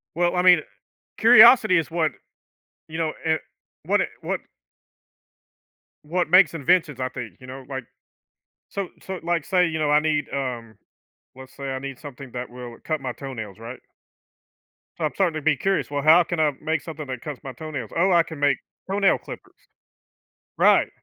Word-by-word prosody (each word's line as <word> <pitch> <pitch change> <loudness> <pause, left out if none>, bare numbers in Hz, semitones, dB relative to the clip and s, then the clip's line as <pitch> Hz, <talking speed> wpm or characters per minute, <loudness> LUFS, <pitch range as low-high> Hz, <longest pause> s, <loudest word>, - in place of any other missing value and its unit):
Well, 175 +1 +1
I 180 - +2
mean, 180 -3 +7
eh - - -13 0.6
curiosity 225 -3 +8
is 165 -3 0
what 160 -3 0 0.8
you 160 - -6
know, 160 -2 -1
and 160 0 +2 0.5
what - - +2
it - - -2
what - - -3 1.6
what 175 +2 -1
makes 180 -1 +6
inventions, 160 -3 +1
I 130 - -1
think, 115 -8 -8
you 130 - -12
know? 130 +1 -9
Like 130 -2 -5 0.8
so 200 -2 -4
so, 190 -1 -6
like, 170 -2 -1
say, 180 -1 +2
you 160 0 -3
know, 150 -1 0
I 150 0 +5
need, 150 -1 0
um, 120 -5 -4 0.6
let's 130 0 -13
say 140 -1 -5
I 130 - -3
need 135 -1 -7
something 140 -3 -10
that 125 0 -5
will 120 -1 -9
cut 155 -2 -2
my 130 -2 -4
toenails, 110 -8 -8
right? 115 +3 -9 1.2
So 160 - -3
I'm 150 - -1
starting 180 -5 +1
to 155 - -4
be 150 -2 +2
curious, 195 -1 -1
"Well, 145 -1 -2
how 160 +4 +7
can 175 - -4
I 150 -2 +3
make 160 0 -1
something 155 -3 -7
that 130 -2 -5
cuts 150 -4 -7
my 135 - -6
toenails? 140 -4 -7
Oh, 185 +2 +3
I 170 -1 +5
can 160 -1 -9
make 145 -2 +2 0.3
toenail 195 0 +2
clippers." - - -11 1.0
Right. - - +5
155 Hz, 185 wpm, -23 LUFS, 130-175 Hz, 1.6 s, curiosity